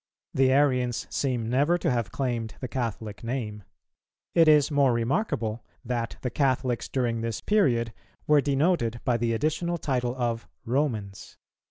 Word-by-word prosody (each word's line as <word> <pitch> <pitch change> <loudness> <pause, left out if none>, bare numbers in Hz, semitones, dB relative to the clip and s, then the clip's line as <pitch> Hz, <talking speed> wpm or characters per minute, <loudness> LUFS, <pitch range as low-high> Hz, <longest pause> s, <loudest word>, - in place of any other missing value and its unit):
The 130 0 +4
Arians 125 -3 +2
seem 125 -5 -1
never 145 +8 +2
to 170 -4 0
have 120 -2 -1
claimed 120 -5 -2
the 130 - -4
Catholic 115 -4 -4
name. 115 -4 -3 0.7
It 165 -1 +5
is 150 -1 +5
more 140 -3 +4
remarkable 115 - -1 0.2
that 120 -1 -2
the 125 - -2
Catholics 130 -3 0
during 120 -3 0
this 115 -2 -2
period 120 - +2 0.3
were 150 -1 +5
denoted 140 -4 +1
by 120 -2 +2
the 115 0 0
additional 160 +7 0
title 125 -5 -1
of 115 -5 -2 0.2
"Romans." 115 -7 -2
125 Hz, 145 wpm, -27 LUFS, 115-140 Hz, 0.7 s, It